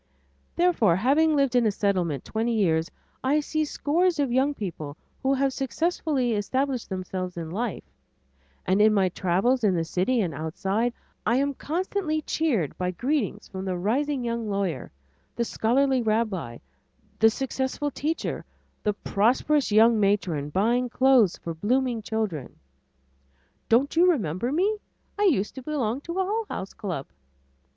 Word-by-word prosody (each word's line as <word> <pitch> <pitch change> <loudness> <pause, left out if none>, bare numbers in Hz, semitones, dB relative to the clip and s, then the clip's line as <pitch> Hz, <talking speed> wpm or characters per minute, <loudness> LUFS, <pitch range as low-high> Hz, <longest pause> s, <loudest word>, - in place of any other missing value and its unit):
Therefore 340 - +3
having 295 - +3
lived 275 -3 +2
in 240 -2 +4
a - - +2
Settlement 180 -9 -1
twenty 225 +1 -1
years, 165 -5 +2 0.3
I 280 +4 +3
see 310 +1 -1
scores 335 +4 +1
of 280 -4 0
young 270 +4 +2
people 155 - -6 0.2
who 270 +1 +2
have 270 0 +1
successfully 275 -2 -1
established 255 +4 -1
themselves 185 -1 -4
in 165 -1 -5
life, 220 +2 -3 0.8
and 190 +3 +3
in 215 0 +5
my 190 -2 +3
travels 195 +9 +1
in 195 -4 +3
the 165 - +1
city 185 +9 0
and 175 -6 -2
outside, 190 +10 -1 0.3
I 235 - +2
am 280 +2 +1
constantly 320 +1 -2
cheered 245 - 0
by 180 0 0
greetings 245 - -2
from 190 0 -6
the 185 -2 -2
rising 255 +7 0
young 230 -2 -2
lawyer, 195 -9 -2 0.5
the 235 - 0
scholarly 260 +4 +2
rabbi, 215 - -1 0.6
the 225 - +7
successful 265 +4 -2
teacher, 310 +5 -3 0.4
the 210 - 0
prosperous 245 +8 +1
young 220 +1 +5
matron 190 -8 +1
buying 235 +9 +1
clothes 255 -7 +4
for 165 - -5
blooming 240 +6 0
children. 210 - -3 1.1
"Don't 260 +7 +3
you 355 +2 +6
remember 210 - -1
me? 390 +8 +1 0.4
I 415 - +3
used 235 - +2
to 265 - -8
belong 260 -3 -2
to 335 - -6
a 380 - +2
Hull 435 +3 -2
House 190 - -5
club." 175 -9 -4
235 Hz, 150 wpm, -26 LUFS, 190-275 Hz, 1.1 s, the